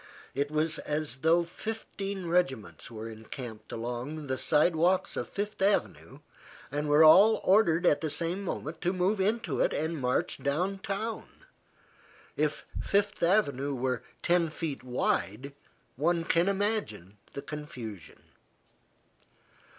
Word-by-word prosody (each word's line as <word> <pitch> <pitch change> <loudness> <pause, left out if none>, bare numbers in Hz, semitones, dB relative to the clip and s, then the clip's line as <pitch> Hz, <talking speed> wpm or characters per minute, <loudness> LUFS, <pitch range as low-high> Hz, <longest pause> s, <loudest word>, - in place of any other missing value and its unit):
It 140 +1 -1
was 155 +1 0
as 150 -4 -3
though 165 +5 +3
fifteen 195 0 -5
regiments 165 -10 -1
were 110 -1 -7
encamped 110 +1 -9
along 125 +6 -4
the 130 -1 -2
sidewalks 175 +4 +2
of - - -3
Fifth 205 0 -4
Avenue 200 +1 0 0.5
and 145 +1 -2
were 150 +2 +6
all 195 +8 +8
ordered 185 -3 +4
at 145 -4 +4
the 155 - -1
same 170 +5 -2
moment 160 -3 -5
to 180 +1 +1
move 190 +3 +1
into 220 +4 0
it - - +2
and 160 +2 -1
march 125 0 0
downtown. 195 +8 -2 1.1
If - - -1 0.2
Fifth 200 0 0
Avenue 145 -7 +2
were 125 -1 -1 0.2
ten 170 -1 +3
feet 155 -3 -5
wide, 125 0 -1 0.4
one 165 +5 +1
can 170 +3 +2
imagine 190 - -2
the 140 - -6
confusion. 120 - -8
160 Hz, 125 wpm, -29 LUFS, 135-190 Hz, 1.1 s, all